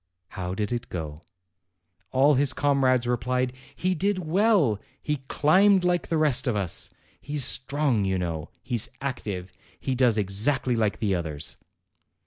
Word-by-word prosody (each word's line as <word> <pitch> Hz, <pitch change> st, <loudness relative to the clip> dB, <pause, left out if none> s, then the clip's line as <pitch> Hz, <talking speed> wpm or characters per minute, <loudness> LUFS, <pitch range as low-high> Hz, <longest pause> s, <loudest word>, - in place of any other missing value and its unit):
how 90 Hz, 0 st, -5 dB
did 105 Hz, +2 st, -2 dB
it 120 Hz, 0 st, -3 dB
go?" 80 Hz, -3 st, -6 dB, 0.9 s
all 135 Hz, +6 st, +4 dB
his 135 Hz, -1 st, +2 dB
comrades 130 Hz, -3 st, +2 dB
replied, 125 Hz, +1 st, -1 dB, 0.2 s
"He 185 Hz, +2 st, 0 dB
did 195 Hz, +3 st, 0 dB
well 180 Hz, -, +2 dB, 0.2 s
he 150 Hz, -1 st, -2 dB
climbed 190 Hz, +7 st, +4 dB
like 180 Hz, -1 st, +1 dB
the 165 Hz, -, 0 dB
rest 150 Hz, -5 st, +3 dB
of 120 Hz, -, +1 dB
us 95 Hz, -5 st, -2 dB, 0.3 s
he's 145 Hz, -3 st, 0 dB
strong, 135 Hz, -4 st, +1 dB
you 95 Hz, -1 st, 0 dB
know 85 Hz, -4 st, -4 dB
he's 120 Hz, -4 st, 0 dB
active 105 Hz, -9 st, -5 dB, 0.3 s
he 130 Hz, -, -2 dB
does 125 Hz, -3 st, +3 dB
exactly 110 Hz, +6 st, +2 dB
like 110 Hz, -3 st, 0 dB
the 105 Hz, -4 st, 0 dB
others." 80 Hz, -4 st, -2 dB
125 Hz, 145 wpm, -26 LUFS, 100-150 Hz, 0.9 s, all